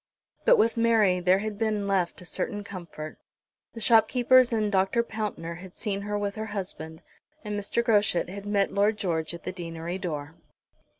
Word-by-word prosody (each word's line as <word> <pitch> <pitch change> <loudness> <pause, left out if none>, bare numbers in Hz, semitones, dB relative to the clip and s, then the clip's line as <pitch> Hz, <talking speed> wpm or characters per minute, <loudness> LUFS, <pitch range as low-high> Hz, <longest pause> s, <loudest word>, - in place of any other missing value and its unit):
But - - +7
with 230 - +2
Mary 220 -5 +4
there 180 +1 +4
had 210 +1 -4
been 215 -3 0
left 185 -4 0
a - - -11
certain 205 +4 -3
comfort. 170 -6 -8 0.5
The 230 - -8
shopkeepers 245 +3 +5
and 215 -2 +1
Dr. 195 +4 +2
Pountner 200 -7 -5
had 185 -1 -12
seen 200 -3 -3
her 205 +1 -2
with 205 -1 -2
her 220 0 -3
husband, 170 -6 -6 0.4
and 210 -1 -4
Mr. 205 +3 -1
Groschut 210 -6 +2
had 200 +3 -8
met 200 -1 +1
Lord 210 +2 +2
George 165 -4 -2
at 170 - -11
the - - -3
deanery 170 0 -5
door. 150 -4 -4
200 Hz, 175 wpm, -27 LUFS, 180-215 Hz, 0.5 s, But